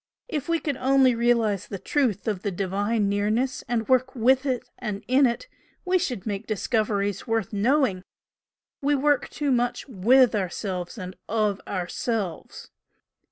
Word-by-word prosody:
If 295 - -4
we 335 - +3
could 290 -5 -2
only 265 -1 +4
realise 230 -4 +1
the 200 - -5
truth 235 -2 0
of 205 -4 -1
the 205 - -1
Divine 200 +3 0
Nearness, 215 +6 0
and 230 -2 -1
work 260 +1 +2
WITH 260 +3 +3
it 250 -1 -1
and 210 -3 -4
IN 260 +2 +5
it, 235 - -3 0.4
we 370 0 +3
should 250 - -3
make 200 -3 -4
discoveries 210 -2 -1
worth 225 -3 -1
knowing! 225 -2 +2 0.8
We 290 +1 +2
work 290 -1 +2
too 290 -2 -1
much 245 -1 0
WITH 250 +3 +4
ourselves 185 -1 -3
and 185 -1 -7
OF 210 -2 0
ourselves." 190 0 -4
230 Hz, 150 wpm, -25 LUFS, 200-260 Hz, 0.8 s, IN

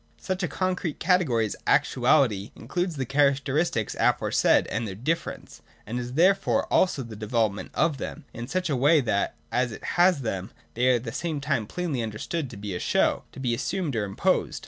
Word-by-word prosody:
143.] - - -19
.Such 185 - -7
a - - +1
concrete 180 -4 -1
category 160 - +2
as 105 - -4
Actuality 125 -6 +3
includes 175 -2 -3
the 135 -2 -2
characteristics 140 -2 +1
aforesaid - - +3
and 115 +1 -1
their 95 - -6
difference, 155 - -3 0.2
and 120 +3 -3
is 125 0 -5
therefore 185 +6 +3
also 165 -7 +3
the 115 -2 -9
development 105 -2 -1
of 150 -5 +1
them, - - -6
in 120 +1 -6
such 180 +6 -1
a 145 - 0
way 145 +5 +5
that, 110 -6 0 0.2
as 125 0 +1
it 110 - -9 0.2
has 180 -5 +5
them, 95 -4 -3 0.2
they 125 +2 +2
are 130 - +5
at 120 - -2
the 115 - -5
same 160 +3 -3
time 140 -7 -1
plainly 160 -4 -2
understood 115 +7 -3
to 115 - -10
be 100 -1 -5
a 90 - -3
show, - - +1
to - - -11
be 125 -3 0
assumed 155 +3 -2
or 110 - 0
im 100 -1 -8
posed - - -20
(§ - - -10
141). - - +2
130 Hz, 210 wpm, -26 LUFS, 110-160 Hz, 0.2 s, way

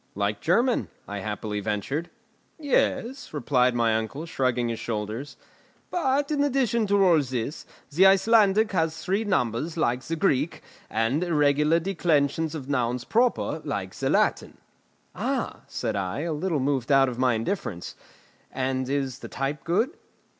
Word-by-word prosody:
"Like 100 +1 -1
German." 235 +10 +2 0.2
I 100 0 -5
happily 105 +1 -4
ventured. 110 - -2 0.5
"Yes," 275 -3 0
replied 125 -4 +2
my 115 -2 +2
uncle, 110 +8 -3
shrugging 125 -6 0
his 115 - -3
shoulders; 110 +5 -4 0.5
"but, 285 -3 +1
in 290 -1 +2
addition 250 -5 +1
to 200 -1 +4
all 170 -4 +5
this, 130 +2 -4 0.2
the 180 +6 +6
Icelandic 210 +2 +4
has 160 -4 0
three 195 +4 +1
numbers 155 - -1
like 125 -5 +1
the 165 - -4
Greek, 155 -3 0 0.3
and 115 +9 0
irregular 150 -1 +3
declensions 160 -3 0
of 140 -4 -6
nouns 125 -3 0
proper 230 - +1
like 100 -10 -4
the - - -2
Latin." - - +1 0.6
"Ah!" - - -2
said - - -3
I, 95 +6 -2
a 165 0 -2
little 155 0 -1
moved 135 -1 0
out 135 -1 +6
of 125 -1 -5
my 130 -2 +3
indifference; 110 - -3 0.6
"and 130 0 -2
is 135 -2 -2
the - - -8
type 135 +1 -3
good?" 215 - +1
145 Hz, 145 wpm, -26 LUFS, 120-190 Hz, 0.6 s, the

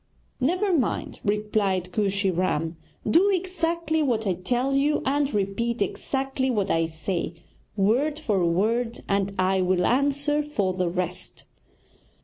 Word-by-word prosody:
'Never 360 +8 +1
mind!' 255 -8 -1
replied 205 -3 0
Kooshy 200 -1 +1
Ram, 165 -2 -1 0.3
'do 345 - +5
exactly 340 -4 0
what 235 -6 0
I 190 - +2
tell 245 +9 -1
you, 285 +2 +2
and 285 +1 +1
repeat 210 +4 -1
exactly 265 +5 -1
what 205 -5 0
I 165 0 +2
say, 165 +1 -3 0.4
word 250 +10 +2
for 210 - 0
word, 225 +8 0
and 200 0 +1
I 185 0 +2
will 180 0 +2
answer 285 +3 +2
for 210 -11 -1
the 180 -1 0
rest.' 180 0 -4
215 Hz, 130 wpm, -25 LUFS, 185-280 Hz, 0.4 s, do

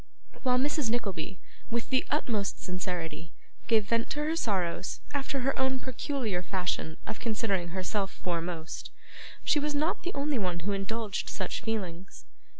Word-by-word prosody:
While 250 -2 +4
Mrs. 285 -1 +3
Nickleby, 195 -6 -1 0.3
with 235 +2 -1
the 260 - +5
utmost 225 -9 +1
sincerity, 170 -3 -3 0.3
gave 220 -3 +5
vent 230 +2 +2
to 295 - 0
her 315 +2 +2
sorrows 190 - 0
after 275 -1 0
her 270 +2 +3
own 265 0 +3
peculiar 255 -7 -1
fashion 180 -3 -1
of - - -4
considering 215 -5 +1
herself 190 +3 0
foremost, 170 -3 -3 0.5
she 300 - +5
was 295 0 0
not 310 +4 +2
the 360 - -3
only 280 -2 +1
one 180 -3 0
who 200 +5 0
indulged 200 +1 -1
such 185 -2 -2
feelings. 190 -5 -3
215 Hz, 150 wpm, -31 LUFS, 180-260 Hz, 0.5 s, the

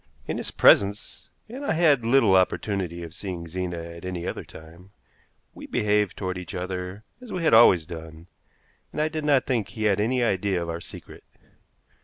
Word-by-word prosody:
In - - -3
his - - -4
presence 100 +1 +3 0.2
and 255 +6 -8
I 280 - 0
had 155 -7 +3
little 115 -4 +4
opportunity 95 -2 0
of 80 -1 -9
seeing 90 -3 -6
Zena 90 +1 -4
at 85 0 -9
any 90 -2 -5
other - - -4
time 80 +4 -14 0.6
we - - -10
behaved 105 -1 0
toward 95 -2 -3
each 90 +1 -8
other 90 +2 -5 0.2
as 250 - -11
we 180 - -3
had 160 - +3
always 95 -8 +7
done, 80 -1 -10 0.7
and - - -6
I 155 +1 +1
did 155 -1 -4
not 145 -3 +3
think 115 -7 -1
he 110 -2 -6
had 105 -2 +2
any 125 +4 +1
idea 95 -4 0
of 85 -1 -4
our 85 +1 -5
secret. - - -11
95 Hz, 185 wpm, -25 LUFS, 85-115 Hz, 0.7 s, always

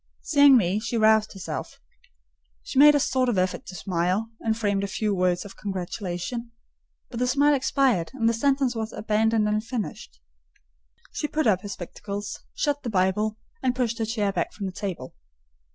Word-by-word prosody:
Seeing 285 -4 +6
me, 195 -1 +1
she 235 +1 -3
roused 220 -1 +4
herself: 195 -2 -6 0.8
she - - -1
made 295 +1 +8
a - - +4
sort 260 -2 +1
of 225 - 0
effort 185 0 -1
to 185 - -8
smile, 185 +5 -1
and 220 -1 -1
framed 200 -3 0
a - - -1
few 210 +1 -1
words 180 0 +1
of 200 - -10
congratulation; 195 +3 -4 0.6
but 235 - -5
the 250 - +1
smile 285 +3 +4
expired, 260 -9 +1
and 230 -4 +1
the 230 - +3
sentence 270 +1 +1
was 220 -1 -4
abandoned 215 0 +1
unfinished. 210 - -3 0.9
She 300 - -2
put 310 0 -1
up 195 -5 +3
her 205 - -7
spectacles, 200 +2 -6 0.2
shut 290 -1 0
the 240 - -4
Bible, 210 +2 +1 0.2
and 255 -1 0
pushed 235 -2 -1
her 225 - 0
chair 215 -3 0
back 175 -3 -2
from 205 - -5
the 190 - -3
table. 180 -9 -5
215 Hz, 175 wpm, -25 LUFS, 190-245 Hz, 0.9 s, made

